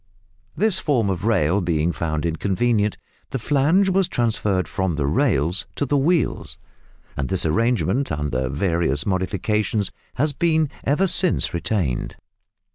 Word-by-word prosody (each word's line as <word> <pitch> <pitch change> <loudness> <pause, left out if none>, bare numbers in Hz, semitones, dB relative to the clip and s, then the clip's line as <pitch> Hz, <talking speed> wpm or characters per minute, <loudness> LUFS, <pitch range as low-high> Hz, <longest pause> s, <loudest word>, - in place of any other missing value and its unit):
This 200 0 +1
form 125 - +1
of 95 +1 -4
rail 100 -4 +2
being 85 -1 0
found 80 -2 -2
inconvenient, 105 +6 0 0.3
the - - -2
flange 150 - +2
was 190 -1 +2
transferred 105 -5 0
from 95 -3 -1
the 75 -2 -1
rails 75 +5 +1
to 145 - -1
the 145 - 0
wheels, 155 +2 0 0.6
and 70 - -3
this 95 -2 -1
arrangement, 115 - +1
under 70 -4 -2
various 80 -1 0
modifications 100 +2 -1 0.2
has 145 +3 0
been 160 -1 +1
ever 150 +8 +2
since 180 -1 +2
retained. 85 - -2
100 Hz, 130 wpm, -22 LUFS, 85-140 Hz, 0.6 s, rail